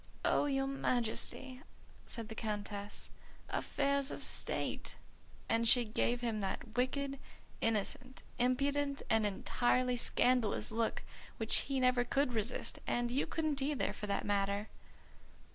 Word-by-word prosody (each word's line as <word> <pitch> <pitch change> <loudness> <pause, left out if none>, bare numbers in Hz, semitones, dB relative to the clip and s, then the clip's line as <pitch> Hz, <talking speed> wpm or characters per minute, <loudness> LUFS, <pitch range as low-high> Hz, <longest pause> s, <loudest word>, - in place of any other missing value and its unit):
"Oh, - - +3
your 270 -1 +1
Majesty," 255 0 -1 0.5
said 230 -3 -4
the 220 - -6
Countess, 205 -2 -4 0.4
"affairs 280 0 0
of - - -5
state," - - 0 0.5
and 230 0 +3
she 245 -1 +6
gave 235 +2 0
him 225 -3 -1
that 205 +3 -4
wicked, 275 +2 0 0.4
innocent, 225 +4 -1 0.2
impudent, 280 +3 +1
and 220 -1 +4
entirely 245 +5 +1
scandalous 245 -3 +2
look 225 0 0 0.3
which - - +3
he 270 -1 +1
never 250 -1 +4
could 270 +1 +1
resist, 225 +1 -1
and 240 0 0
you 265 +3 +1
couldn't 310 -4 -1
either 280 +1 0
for 210 - -6
that 200 - -1
matter. 200 +1 0
245 Hz, 125 wpm, -35 LUFS, 220-270 Hz, 0.5 s, she